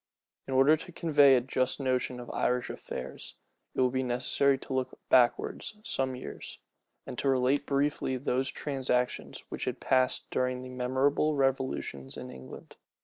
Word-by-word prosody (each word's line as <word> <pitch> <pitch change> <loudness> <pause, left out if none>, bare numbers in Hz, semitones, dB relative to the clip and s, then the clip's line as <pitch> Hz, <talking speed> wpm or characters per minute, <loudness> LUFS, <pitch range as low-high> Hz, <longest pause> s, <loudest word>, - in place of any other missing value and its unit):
In 135 - -2
order 140 +4 +6
to 180 - -10
convey 145 -5 +5
a 125 - +3
just 130 +1 0
notion 130 -2 -1
of 120 - -7
Irish 125 0 0
affairs, - - -7 0.4
it - - +1
will 125 -1 +3
be 130 0 0
necessary 130 +2 +2
to 135 - -7
look 130 -1 -2
backwards 125 - +2
some 130 -7 -1
years, 125 - -8 0.5
and - - -6
to 140 - +1
relate 135 +2 +2
briefly 140 -2 0
those 130 +1 0
transactions 130 -3 -2
which - - -4
had - - -3
passed 130 -1 +1
during 125 0 -1
the 130 - -8
memorable 130 +4 +1
revolutions 130 - -1
in - - -7
England. 65 0 -11
130 Hz, 155 wpm, -30 LUFS, 125-140 Hz, 0.5 s, order